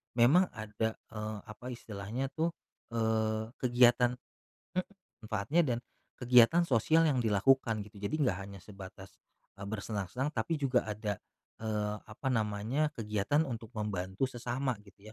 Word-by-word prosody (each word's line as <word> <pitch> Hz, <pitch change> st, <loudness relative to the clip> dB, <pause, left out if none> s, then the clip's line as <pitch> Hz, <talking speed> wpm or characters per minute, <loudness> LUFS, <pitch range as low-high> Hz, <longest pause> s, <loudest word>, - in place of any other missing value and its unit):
memang 145 Hz, +11 st, +6 dB
ada, 110 Hz, 0 st, -2 dB
eee, 110 Hz, -1 st, -6 dB
apa 110 Hz, +3 st, -11 dB
istilahnya 115 Hz, +5 st, -4 dB
tuh, 165 Hz, +3 st, -1 dB, 0.4 s
eee, 110 Hz, 0 st, +1 dB
kegiatan 125 Hz, 0 st, +5 dB, 0.6 s
mhm, 185 Hz, 0 st, +1 dB, 0.4 s
manfaatnya 110 Hz, +11 st, +1 dB
dan 120 Hz, -6 st, 0 dB, 0.4 s
kegiatan 125 Hz, +7 st, +6 dB
sosial 160 Hz, +6 st, +4 dB
yang 130 Hz, -5 st, +2 dB
dilakukan 110 Hz, +1 st, +3 dB
gitu 105 Hz, -1 st, -14 dB
jadi 100 Hz, -, -1 dB
nggak 120 Hz, -10 st, +2 dB
hanya 100 Hz, 0 st, -9 dB
sebatas, 95 Hz, 0 st, -11 dB, 0.4 s
bersenang-senang 105 Hz, -, -3 dB
tapi 120 Hz, +8 st, 0 dB
juga 135 Hz, -3 st, +3 dB
ada 105 Hz, -1 st, -3 dB, 0.4 s
eee, 105 Hz, -1 st, -1 dB
apa 110 Hz, +5 st, -4 dB
namanya, 110 Hz, +7 st, +1 dB
kegiatan 110 Hz, +7 st, +1 dB
untuk 115 Hz, -4 st, -5 dB
membantu 95 Hz, +1 st, -1 dB
sesama 125 Hz, +2 st, -2 dB
gitu 100 Hz, +2 st, -15 dB
110 Hz, 125 wpm, -32 LUFS, 105-130 Hz, 0.6 s, memang